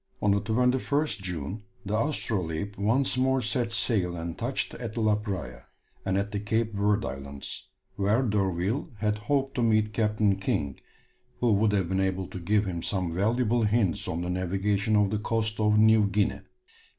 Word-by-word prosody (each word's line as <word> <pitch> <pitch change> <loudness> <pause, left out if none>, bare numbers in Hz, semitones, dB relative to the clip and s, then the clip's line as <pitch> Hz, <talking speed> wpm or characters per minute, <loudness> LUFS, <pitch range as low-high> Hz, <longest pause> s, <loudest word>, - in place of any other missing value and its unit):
On 105 - +2
the 100 0 +2
21st 125 +4 +1
June 90 +2 -4 0.2
the 100 - -3
Astrolabe 100 - -1
once 125 +6 +1
more 130 +1 +3
set 120 0 -1
sail 100 -5 0
and 85 0 -4
touched 125 +3 -2
at 115 -2 -6
La 110 -2 +3
Praya, 105 -2 -4 0.4
and 95 0 0
at 100 +1 -1
the 100 - -2
Cape 110 +2 -1
Verd 105 +1 +1
Islands, 70 0 -7 0.3
where 105 +6 +2
D'Urville 100 - 0
had 105 +1 0
hoped 135 -1 +1
to 125 - -1
meet 110 -2 +2
Captain 105 -2 +2
King, 70 -8 -2 0.6
who 120 -2 +3
would 105 +1 +3
have 95 -4 +1
been 95 +2 0
able 95 0 0
to 95 - -6
give 105 +4 +1
him 85 -3 -3
some 90 -3 -1
valuable 115 +5 +1
hints 105 -4 +1
on 85 - -2
the 90 - -3
navigation 95 +4 0
of 105 -2 +3
the 105 - 0
coast 110 0 -1
of 105 0 +3
New 110 -1 +5
Guinea. 100 0 0
105 Hz, 175 wpm, -27 LUFS, 95-115 Hz, 0.6 s, New